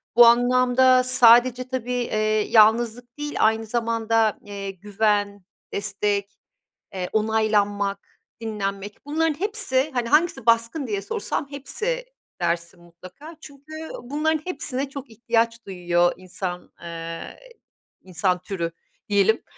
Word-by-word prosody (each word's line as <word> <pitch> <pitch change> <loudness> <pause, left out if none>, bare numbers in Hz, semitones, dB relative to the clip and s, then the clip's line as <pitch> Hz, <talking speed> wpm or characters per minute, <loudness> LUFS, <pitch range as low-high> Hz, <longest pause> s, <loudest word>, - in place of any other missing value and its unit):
Bu 240 0 +9
anlamda 255 +2 +4
sadece 250 0 +5
tabii, 255 -1 -4
eee, 215 -3 0
yalnızlık 235 +3 +3
değil 295 0 -5
aynı 220 +1 +2
zamanda, 225 -1 0
eee, 200 -1 -6
güven, 205 0 -1 0.3
destek, 205 0 -2 0.5
eee, 185 -2 -4
onaylanmak, 205 -2 0 0.3
dinlenmek 205 -1 -5
bunların 310 +1 0
hepsi, 380 -9 0
hani, 245 -2 -1
hangisi 305 -4 +2
baskın 230 +5 +2
diye 205 -3 -2
sorsam 200 +8 -3
hepsi 470 - -4 0.4
dersin 170 +1 -2
mutlaka. 185 - -13
Çünkü 285 +1 -13 0.3
bunların 305 +4 -1
hepsine 280 -6 -3
çok 275 -1 -8
ihtiyaç 230 0 -1
duyuyor 175 -2 +1
insan, 180 -1 -6
eee, 165 0 -7 0.7
insan 185 0 0
türü 170 -3 -4 0.4
diyelim. 205 +2 +2
225 Hz, 110 wpm, -23 LUFS, 200-255 Hz, 0.7 s, Bu